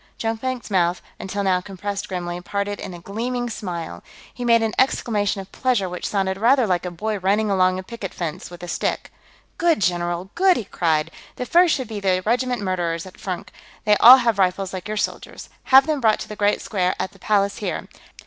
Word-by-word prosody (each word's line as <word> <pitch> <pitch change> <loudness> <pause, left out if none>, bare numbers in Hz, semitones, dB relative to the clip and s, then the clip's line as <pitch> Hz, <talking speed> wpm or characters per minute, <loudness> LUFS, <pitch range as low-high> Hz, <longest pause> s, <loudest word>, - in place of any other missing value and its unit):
Jonkvank's 230 +1 -3
mouth, 175 -2 +2 0.2
until 200 +1 -3
now 185 -2 +2
compressed 200 +1 -5
grimly, 175 -1 -4
parted 200 +2 -3
in 180 - -7
a - - -10
gleaming 240 +6 -3
smile. 170 - -5 0.3
He 245 - -6
made 230 -1 +4
an 220 - -1
exclamation 205 -6 +1
of 190 - -13
pleasure 245 -7 0
which 180 0 -4
sounded 195 -1 -1
rather 250 +3 +4
like 180 -2 0
a - - -2
boy 210 +4 -3
running 205 +3 +1
along 185 -1 +3
a 185 - -5
picket 210 -2 -7
fence 165 -4 -5
with 175 0 -11
a - - -6
stick. 170 - -2 0.5
"Good, 340 -2 +3
general! 175 0 -1
Good!" 375 0 +4
he - - -3
cried. 165 -4 0 0.2
"The 250 - -4
first 345 +3 +4
should 260 -4 -4
be 215 -2 -5
the 185 -2 +1
regiment 245 0 0
Murderers, 175 -3 -2
at 185 - -13
Furnk; 185 -3 -5 0.4
they 210 -1 +5
all 250 +3 +10
have 230 -5 +1
rifles 190 0 +1
like 185 +1 -5
your 215 0 -3
soldiers. - - -4 0.2
Have 265 +1 +7
them 305 -3 -1
brought 220 -2 +3
to - - -6
the 210 - -7
Great 205 0 +1
Square, 185 -3 0
at - - -2
the 195 - -20
Palace 200 0 +1
here. 210 - -4
200 Hz, 205 wpm, -22 LUFS, 180-230 Hz, 0.5 s, all